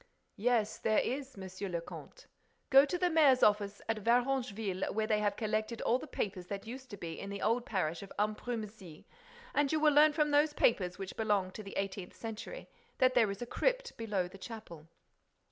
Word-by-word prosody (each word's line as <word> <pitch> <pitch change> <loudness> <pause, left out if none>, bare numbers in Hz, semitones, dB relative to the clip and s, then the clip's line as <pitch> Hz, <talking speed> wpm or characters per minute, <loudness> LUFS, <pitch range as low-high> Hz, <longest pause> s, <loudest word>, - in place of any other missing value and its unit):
"Yes, 225 -1 +1
there 215 -1 +2
is, 265 -1 -1
Monsieur 190 +1 -6
le 170 -1 -1
Comte. - - -11 0.5
Go 270 +1 +8
to 325 +5 -2
the 355 0 +1
mayor's 290 -5 +5
office 205 -1 +2
at 225 -1 0
Varengeville, 230 -4 0
where 220 0 0
they 215 -1 +2
have 205 -1 0
collected 215 +1 -2
all 245 - +2
the 310 - -8
papers 190 -8 -4
that 200 +2 -5
used 260 +3 -8
to 205 - -8
be 165 -3 -6
in 195 - -6
the 200 0 -5
old 235 +2 +1
parish 170 -5 -1
of 200 - -10
Ambrumésy, 210 -5 -4 0.5
and 290 -1 +2
you 315 - +2
will 305 -1 +4
learn 300 +1 +7
from 300 0 +1
those 295 +1 +4
papers, 185 -10 +2
which 195 -1 -6
belong 205 -4 +1
to 215 - -8
the 200 -1 -8
eighteenth 195 -2 -4
century, 225 - -7 0.3
that 255 -1 +4
there 225 -4 +4
is 200 +4 -4
a - - -4
crypt - - -1
below 210 -5 -1
the 195 +2 -13
chapel. 190 -9 -9
215 Hz, 195 wpm, -33 LUFS, 195-260 Hz, 0.5 s, Go